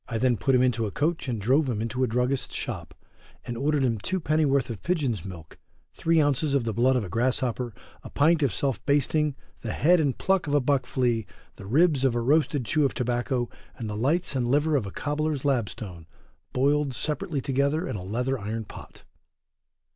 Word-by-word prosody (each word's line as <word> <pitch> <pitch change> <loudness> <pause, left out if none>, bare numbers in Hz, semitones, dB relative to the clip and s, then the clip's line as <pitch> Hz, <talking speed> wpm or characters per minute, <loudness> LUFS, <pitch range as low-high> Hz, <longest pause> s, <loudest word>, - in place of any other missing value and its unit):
I 115 - -2
then 125 +1 +2
put 130 +6 +1
him 125 - +4
into 115 -3 +1
a - - -5
coach 160 - -1
and 120 -4 -2
drove 130 +7 +2
him 115 -4 -1
into 115 +4 -1
a - - +2
druggist's 125 +3 -1
shop - - -5 0.5
and 120 - -4
ordered 145 +3 +1
him 115 -4 +1
two 185 - -2
pennyworth 150 -6 +1
of 110 - -7
pigeon's 140 - -1
milk, 85 -5 -10 0.3
three 165 0 +2
ounces 145 0 +2
of 135 - +2
the 115 -1 -2
blood 125 +5 +3
of 125 - +1
a - - -5
grasshopper, 120 +2 -1 0.3
a - - -10
pint 160 +3 +3
of 140 -5 +2
self 135 -7 -1
basting, 145 +1 +2 0.3
the - - -3
head 175 +3 +4
and 140 -5 0
pluck 190 -4 +1
of 145 - +1
a - - +5
buck 135 -1 +1
flea, 120 -4 0 0.3
the 95 - -10
ribs 145 - +3
of 130 -3 +2
a - - +1
roasted 145 +1 +2
chew 155 +6 +2
of 140 - +1
tobacco, 120 0 -1 0.3
and 115 - -5
the 105 - -4
lights 140 +8 0
and 125 -2 0
liver 150 +3 +2
of 120 -8 0
a - - -6
cobbler's 150 +1 -2
lapstone, 105 - -2 0.4
boiled 140 +1 +1
separately 150 +3 -2
altogether 140 +6 0
in - - -3
a 95 - -5
leather 125 +7 -1
iron 110 +2 -4
pot. - - -12
130 Hz, 205 wpm, -26 LUFS, 115-145 Hz, 0.5 s, a